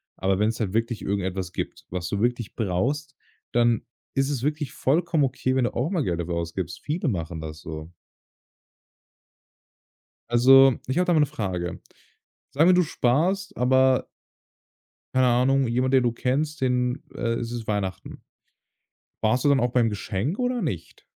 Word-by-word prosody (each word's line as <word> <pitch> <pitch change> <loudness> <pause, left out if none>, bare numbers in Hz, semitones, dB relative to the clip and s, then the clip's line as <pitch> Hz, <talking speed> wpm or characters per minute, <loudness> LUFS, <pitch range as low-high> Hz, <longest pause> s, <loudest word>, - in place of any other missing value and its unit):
Aber 95 0 0
wenn 105 +1 +3
es 115 - -4
halt 100 -5 -2
wirklich 115 0 -1
irgendetwas 95 -2 -2
gibt, - - -5
was 90 -1 -4
du 100 +2 -2
wirklich 120 -2 -1
brauchst, 130 +9 -1 0.4
dann 120 -1 +2 0.3
ist 135 0 +1
es 140 -5 -2
wirklich 150 -2 -1
vollkommen 160 +1 +1
okay, 130 0 -1
wenn 130 -2 +2
du - - -2
auch 130 +6 -1
mal 175 -5 0
Geld 85 -7 -1
dafür 85 0 -3
ausgibst. 85 +1 -4
Viele 155 +1 -1
machen 85 -5 -4
das 80 0 -7
so. 80 +1 -8 2.4
Also, 135 +2 +7
ich 130 - -2
habe 180 +1 +2
da 180 - +3
mal 165 - +4
'ne 150 - +4
Frage. 95 -11 -4 0.7
Sagen 160 +6 +5
wir, - - +6
du 180 - +5
sparst, 165 +9 0
aber 130 +1 +3 1.1
Keine 130 0 +4
Ahnung, 130 +2 +3
jemand, 125 +3 0
der 130 -2 +5
du 120 - +1
kennst, 145 +6 -1
den 125 -1 0
äh, 115 -1 -1
es 115 0 -3
ist 120 -2 -5
Weihnachten. 100 -3 -4 1.0
Sparst 115 +3 +2
du 145 - +5
dann 140 -1 +4
auch 120 0 0
beim 120 -3 +3
Geschenk 105 - -3
oder 245 -1 0
nicht? 110 - -5
125 Hz, 165 wpm, -25 LUFS, 100-140 Hz, 2.4 s, Also